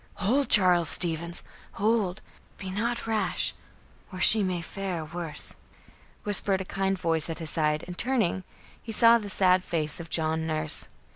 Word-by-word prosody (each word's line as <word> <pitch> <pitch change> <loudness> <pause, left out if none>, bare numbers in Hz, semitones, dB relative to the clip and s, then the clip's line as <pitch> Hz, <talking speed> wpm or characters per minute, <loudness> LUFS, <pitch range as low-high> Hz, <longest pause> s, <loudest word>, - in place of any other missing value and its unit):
"Hold, 255 +8 0
Charles 180 -6 +5
Stevens! 170 0 +2 0.3
Hold! 210 -3 -1 0.3
Be 190 -1 -7
not 230 +5 -3
rash, 220 -1 -1 0.6
or 185 - -8
she 215 +4 +5
may 185 -3 -1
fare 180 -1 -5
worse," 165 -1 -4 0.7
whispered 200 -1 +3
a 190 - -5
kind 195 0 -2
voice 165 -3 +1
at 165 - -4
his 160 -2 -3
side, 150 -1 0
and, 180 - -8
turning, 220 -6 0 0.4
he 225 - -8
saw 230 +1 +5
the 205 -2 -8
sad 185 -1 +2
face 155 -3 -2
of 165 -1 -9
John 160 0 0
Nurse. 155 -1 -1
185 Hz, 155 wpm, -26 LUFS, 165-205 Hz, 0.7 s, Charles